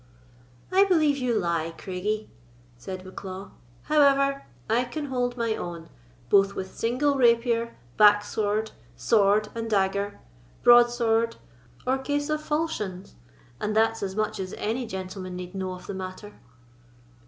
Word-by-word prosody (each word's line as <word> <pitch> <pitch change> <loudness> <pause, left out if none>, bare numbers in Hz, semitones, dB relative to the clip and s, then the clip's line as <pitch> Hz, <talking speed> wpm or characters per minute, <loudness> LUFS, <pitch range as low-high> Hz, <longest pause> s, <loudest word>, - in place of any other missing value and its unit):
"I 380 +1 +6
believe 310 -7 +3
you 245 -3 0
lie, 165 -3 -1
Craigie," 210 +4 -3 0.4
said 185 +10 -7
Bucklaw; 190 +1 -8 0.3
"however, 275 -2 +3 0.2
I 240 +3 +2
can 300 +4 -5
hold 250 -2 -2
my 230 -2 0
own, 170 -4 -7 0.4
both 195 +6 +4
with 190 0 -6
single 275 +5 +1
rapier, 235 -1 +2 0.2
backsword, 210 +1 +3 0.2
sword 205 - +3
and 230 0 -4
dagger, 200 0 0 0.4
broadsword, 235 -1 +5 0.5
or 260 +1 +1
case 290 +2 -2
of 305 0 0
falchions—and 190 - -4
that's 225 +1 +2
as 190 -1 -3
much 215 -1 -1
as 185 -1 -5
any 230 +3 -2
gentleman 185 -1 -6
need 180 0 -7
know 190 -1 -3
of 180 - -10
the - - -5
matter." 190 +2 -7
215 Hz, 130 wpm, -26 LUFS, 190-245 Hz, 0.5 s, I